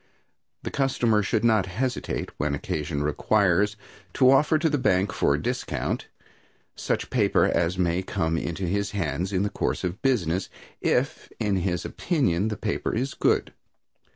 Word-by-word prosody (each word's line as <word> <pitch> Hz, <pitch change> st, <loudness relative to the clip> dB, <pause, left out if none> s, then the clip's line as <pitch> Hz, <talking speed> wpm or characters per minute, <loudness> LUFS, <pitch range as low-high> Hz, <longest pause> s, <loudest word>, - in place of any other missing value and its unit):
The -, -, -4 dB
customer 120 Hz, -6 st, +2 dB
should 105 Hz, +3 st, 0 dB
not 110 Hz, -5 st, +3 dB
hesitate, 125 Hz, +7 st, -3 dB
when 75 Hz, -1 st, 0 dB
occasion 75 Hz, +1 st, -3 dB
requires, 100 Hz, +5 st, +2 dB, 0.4 s
to 130 Hz, -1 st, +6 dB
offer 150 Hz, +3 st, +4 dB
to 160 Hz, +1 st, +1 dB
the 145 Hz, -2 st, +1 dB
bank 95 Hz, -6 st, +2 dB
for 70 Hz, -, +2 dB
discount 75 Hz, -, -3 dB, 0.7 s
such -, -, -2 dB
paper -, -, +3 dB
as 85 Hz, +2 st, +1 dB
may 90 Hz, 0 st, +1 dB
come 80 Hz, -3 st, -1 dB
into 85 Hz, +3 st, -3 dB
his 100 Hz, +4 st, -1 dB
hands 85 Hz, +2 st, -1 dB
in 95 Hz, 0 st, +1 dB
the 105 Hz, -, 0 dB
course -, -, -2 dB
of 90 Hz, +2 st, -3 dB
business, 95 Hz, -9 st, 0 dB, 0.3 s
if, -, -, 0 dB
in 100 Hz, -2 st, +1 dB
his 90 Hz, -1 st, -1 dB
opinion, 110 Hz, -, 0 dB
the 110 Hz, -2 st, -3 dB
paper -, -, -2 dB
is 130 Hz, +4 st, -1 dB
good. -, -, +1 dB
95 Hz, 155 wpm, -25 LUFS, 85-115 Hz, 0.7 s, to